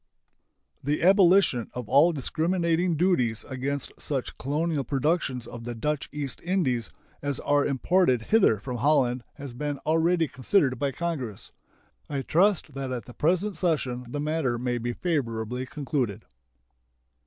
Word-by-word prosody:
The 145 +4 0
abolition 185 - +5
of 125 -3 -5
all 150 +8 +5
discriminating 170 +3 0
duties 130 - +1
against 140 +1 -3
such 135 -4 -2
colonial 150 +2 -1
productions 135 -1 0
of 120 -1 -9
the 120 0 -5
Dutch 150 +5 -2
East 145 -2 -5
Indies 150 - 0 0.3
as 145 -2 -2
are 145 0 +2
imported 135 -2 +2
hither 200 - +4
from 125 +3 -5
Holland 125 -2 +2
has 140 -4 -8
been 145 +3 -3
already 165 +1 +2
considered 130 - +1
by 140 -1 0
Congress. 135 - -4 0.6
I 140 -2 -2
trust 180 -2 +2
that 135 -1 -4
at 125 -2 -4
the 125 - -11
present 180 - 0
session 130 -8 -1
the 145 - -4
matter 150 -5 0
may 120 0 -1
be 120 +1 -2
favorably 125 -6 -2
concluded. 140 - -3
140 Hz, 140 wpm, -26 LUFS, 125-165 Hz, 0.6 s, abolition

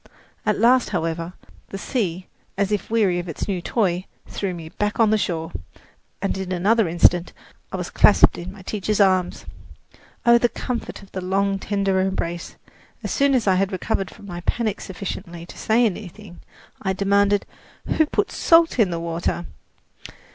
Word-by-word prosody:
At 210 - +2
last, 245 +3 +4
however, 165 -1 -2 0.4
the 195 - -5
sea, 190 -6 -2 0.3
as 200 0 +1
if 210 - -1
weary 205 -6 +2
of 175 0 -6
its 160 - -4
new 190 -4 -2
toy, 185 -3 0 0.2
threw 195 -2 -3
me 165 -3 -7
back 210 +6 -2
on 220 -2 +5
the - - +5
shore, 165 -3 -2 0.7
and 195 - 0
in 190 -1 -4
another 200 +4 +3
instant 175 +1 +3 0.4
I - - -3
was - - -5
clasped - - +5
in 175 +2 -6
my 195 -1 -13
teacher's 210 +2 -2
arms. 185 -3 +2 0.8
Oh, 235 0 +7
the 240 - +3
comfort 235 -4 -5
of 195 - -17
the 185 - -4
long, 195 +1 0
tender 195 -1 0
embrace! 180 -2 -2 0.5
As - - -3
soon 280 -1 +3
as 245 - +1
I 195 - +4
had 195 +2 +1
recovered 195 0 -2
from - - -14
my 175 -3 -6
panic 220 +2 -1
sufficiently 180 -2 -6
to - - -12
say 230 +2 +2
anything, 200 -2 -5 0.4
I 190 -1 0
demanded: 200 +1 +2 0.4
"Who 315 - +2
put - - 0
salt 330 -5 +4
in 210 -5 +5
the 170 -1 -2
water?" 170 +1 -2
195 Hz, 170 wpm, -23 LUFS, 180-215 Hz, 0.8 s, Oh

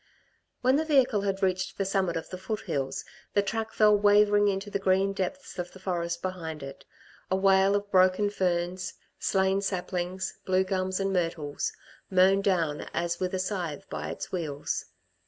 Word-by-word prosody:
When 255 +2 +4
the 315 - +1
vehicle 265 -8 +3
had 195 0 -2
reached 185 +1 0
the 195 - 0
summit 190 -3 0
of 165 - -6
the 185 - -4
foothills, 165 -10 -3 0.3
the 205 - +4
track 220 +2 -2
fell 210 -1 +5
wavering 205 0 +5
into 200 +1 -1
the 200 - -1
green 195 +1 +2
depths 195 +5 -4
of 175 0 -4
the 190 - -12
forest 170 -2 -2
behind 165 -5 -4
it, 135 0 -9 0.4
a 190 - +2
wale 195 +1 +4
of 205 0 -2
broken 185 +2 +4
ferns, 180 -1 -1 0.2
slain 190 0 +2
saplings, 185 -1 -3
blue 185 0 +2
gums 185 0 -1
and 195 0 0
myrtles, 165 -5 -1 0.4
mown 190 +1 +5
down 165 -7 0
as 170 0 -1
with 185 0 -1
a - - -1
scythe 180 -6 -3
by 75 0 -4
its 80 - -6
wheels. 155 -6 -3
190 Hz, 170 wpm, -28 LUFS, 175-200 Hz, 0.4 s, fell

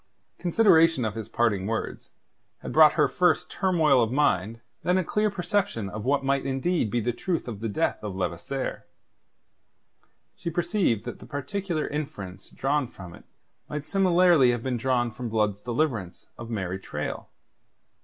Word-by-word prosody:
Consideration 165 - +4
of 110 - -2
his 110 -1 -6
parting 105 -5 +1
words 115 0 -4 0.5
had - - -5
brought - - +7
her - - +3
first - - +1
turmoil 165 -8 +3
of 115 -1 +1
mind, 115 -6 +1 0.2
then 180 +1 +2
a 185 - +2
clear 210 +5 +1
perception 195 - -1
of 110 +1 -6
what 135 +1 +1
might 135 0 +2
be 135 - -4
indeed 135 - 0
the 120 0 0
truth 175 +3 -2
of 110 -4 -5
the 115 +1 -3
death 100 - -1
of 100 -3 -4
Levasseur. 95 +9 -3 1.5
She - - -4
perceived 170 - 0
that 120 - -6
the - - -12
particular 160 +3 -3
inference 105 -11 -6
drawn 140 0 0
from 90 -6 -11
it - - -15 0.4
might 150 0 -4
similarly 175 -6 +4
have 120 -1 0
been 130 -2 -1
drawn 120 -1 0
from 120 +1 -6
Blood's 105 -2 0
deliverance 120 - -2
of 115 -1 -9
Mary 95 -4 -3
Traill. 75 -5 -5
130 Hz, 160 wpm, -26 LUFS, 110-165 Hz, 1.5 s, brought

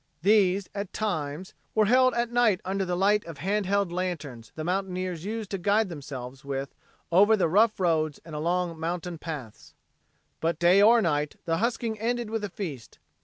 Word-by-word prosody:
These, 200 -1 +3
at 200 -2 -5
times, 175 -4 -3 0.2
were 215 -1 +4
held 255 +4 +4
at 235 0 0
night 240 -6 +3
under 195 +1 -1
the 180 -1 -2
light 205 +2 +3
of 165 -3 -8
hand 195 +5 -1 0.2
lanterns 160 -10 -4
the 155 - -4
mountaineers 185 -1 -2
used 220 -1 -4
to 195 - -2
guide 205 +3 +2
themselves 135 -4 -8
with 140 0 -4 0.4
over 205 +5 +6
the 185 - +2
rough 210 +6 +3
roads 155 -5 +1
and 165 - -10
along 170 +2 -1
mountain 170 0 -3
paths. 145 -11 -8 0.6
But 165 -1 0
day 175 +3 +5
or 225 +2 +6
night, 150 -3 0
the 165 -1 0
husking 225 0 -1
ended 235 0 -1
with 225 -1 -2
a 205 - -2
feast. 155 - -7
185 Hz, 170 wpm, -27 LUFS, 160-210 Hz, 0.6 s, over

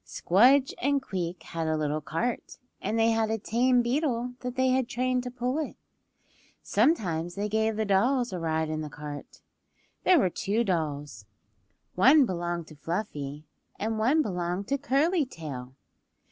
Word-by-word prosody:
Squdge 255 - +4
and 280 +2 +2
Queek 180 -8 -4
had 165 -1 -4
a 155 0 +1
little 150 0 -1
cart, 165 - -3 0.2
and 225 - -1
they 225 0 +4
had 225 -1 +1
a 225 - 0
tame 245 +3 +2
beetle 245 -1 -1
that 250 0 -5
they 260 0 +2
had 255 -1 +1
trained 255 0 0
to 250 - -5
pull 250 +3 -2
it. 310 - -4 0.9
Sometimes 180 - +1
they 205 +1 -2
gave 220 +1 0
the 220 0 -1
dolls 240 +4 +2
a 180 - -3
ride 160 -1 0
in 155 0 -2
the 155 - -5
cart. 145 -1 -9 0.6
There 365 - +6
were 190 - +2
two 215 +7 0
dolls; 150 - -3 0.7
one 265 +9 +6
belonged 175 -4 -3
to 155 - -12
Fluffy, 150 -3 -4 0.3
and 220 +1 -2
one 275 +8 +3
belonged 180 -1 -3
to 280 0 0
Curly 295 +5 +2
Tail. 140 - -8
215 Hz, 160 wpm, -28 LUFS, 165-255 Hz, 0.9 s, There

